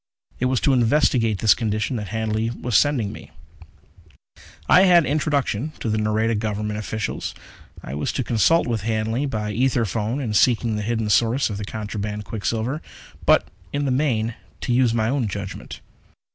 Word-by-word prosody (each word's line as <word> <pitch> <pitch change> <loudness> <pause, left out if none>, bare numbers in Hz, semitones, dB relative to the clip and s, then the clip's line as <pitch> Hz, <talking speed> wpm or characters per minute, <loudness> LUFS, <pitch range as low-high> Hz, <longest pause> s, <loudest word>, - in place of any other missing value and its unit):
It 125 - 0
was 130 -1 +2
to 140 - +3
investigate 120 -3 +2
this 110 - +6
condition 110 +2 -2
that 105 -2 -5
Hanley 110 +1 -1
was 120 -1 -3
sending 120 -2 +3
me. - - -11 1.4
I 180 - +7
had 175 -3 +6
introduction 145 -2 0
to 115 - -2
the 110 - 0
Nareda 110 +2 +1
government 105 0 -2
officials. 110 0 -4 0.5
I 65 - -7
was 75 +1 -2
to 130 - -1
consult 120 +9 +3
with 115 -3 -1
Hanley 110 +5 -1
by 105 -4 -3
ether 120 +1 +1
phone 110 +6 -2
in 120 -6 -3
seeking 115 +2 +3
the 105 - -2
hidden 110 0 -1
source 120 +3 +2
of 100 - -4
the 105 - -4
contraband 105 -1 -5
quicksilver, 115 +7 -2 0.5
but, - - +4 0.2
in 145 0 -1
the 135 - 0
main, 120 -5 0 0.3
to 125 - -1
use 125 -1 +3
my 110 -1 +1
own 130 -2 0
judgment. 100 0 -6
115 Hz, 170 wpm, -22 LUFS, 105-130 Hz, 1.4 s, I